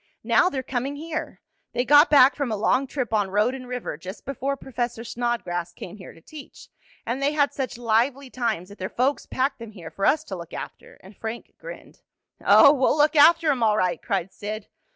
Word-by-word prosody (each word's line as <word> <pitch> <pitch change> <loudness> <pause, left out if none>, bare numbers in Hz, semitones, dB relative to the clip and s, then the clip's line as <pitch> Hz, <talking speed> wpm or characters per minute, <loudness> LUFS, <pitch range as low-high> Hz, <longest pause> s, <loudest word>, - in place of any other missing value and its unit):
"Now 360 - +3
they're 265 -6 -4
coming 265 +2 -3
here. 315 +2 -6 0.3
They 245 +1 0
got 290 +4 +6
back 275 -2 +6
from 280 -5 -2
a 215 - -1
long 255 +6 +1
trip 255 -4 -4
on 205 -3 +1
road 210 +6 +1
and 255 -1 -8
river 250 -10 -5
just 185 +4 -9
before 275 +1 -3
Professor 240 -3 -4
Snodgrass 225 -8 -3
came 180 +3 -10
here 185 - -11
to 165 - -18
teach, 295 - -13 0.4
and 240 +4 -3
they 285 +2 +1
had 285 -2 +1
such 260 -3 -4
lively 245 +4 0
times 220 -8 -2
that 205 - -14
their 185 +1 -4
folks 260 +5 -1
packed 265 +1 -1
them 230 -2 -10
here 170 -5 -10
for 195 - -1
us 305 +1 +2
to 195 - -7
look 170 -1 -10
after," - - -9
and 190 +3 -14
Frank 225 +3 -7
grinned. - - -11 0.4
"Oh, 285 -1 +7
we'll 270 +1 +2
look 300 +1 +3
after 320 +1 +6
'em 260 -4 -2
all 215 -2 +3
right!" 180 -4 0
cried 190 -1 -2
Sid. 210 0 -6
245 Hz, 210 wpm, -24 LUFS, 210-280 Hz, 0.4 s, Oh